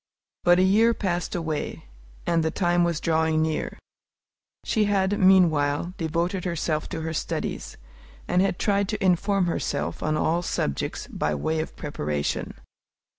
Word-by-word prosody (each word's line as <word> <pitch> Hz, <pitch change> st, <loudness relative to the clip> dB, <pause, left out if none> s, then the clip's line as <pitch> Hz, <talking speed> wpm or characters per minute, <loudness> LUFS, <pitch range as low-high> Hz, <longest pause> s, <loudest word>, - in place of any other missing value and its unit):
But 175 Hz, 0 st, +5 dB
a 185 Hz, -, +4 dB
year 220 Hz, +5 st, +4 dB
passed 180 Hz, -3 st, -2 dB
away, 160 Hz, -, -3 dB, 0.4 s
and 165 Hz, -1 st, +2 dB
the 160 Hz, -, +1 dB
time 175 Hz, +1 st, +2 dB
was 170 Hz, -2 st, 0 dB
drawing 160 Hz, -1 st, +2 dB
near. 160 Hz, -1 st, -2 dB, 0.9 s
She 215 Hz, -1 st, +2 dB
had, 200 Hz, 0 st, +1 dB
meanwhile, 170 Hz, -4 st, +4 dB
devoted 170 Hz, +3 st, -1 dB
herself 160 Hz, -3 st, -2 dB
to 165 Hz, -3 st, -4 dB
her 160 Hz, 0 st, -3 dB
studies, -, -, -4 dB, 0.5 s
and 180 Hz, -, +3 dB
had 195 Hz, -2 st, +1 dB
tried 200 Hz, -1 st, +1 dB
to 215 Hz, -2 st, -2 dB
inform 190 Hz, +1 st, +2 dB
herself 170 Hz, -, -2 dB
on 155 Hz, 0 st, 0 dB
all 170 Hz, +3 st, +1 dB
subjects 70 Hz, -, -2 dB
by 75 Hz, 0 st, -2 dB
way 160 Hz, -, -1 dB
of 155 Hz, -, -4 dB
preparation. 75 Hz, -, -3 dB
170 Hz, 145 wpm, -25 LUFS, 160-190 Hz, 0.9 s, But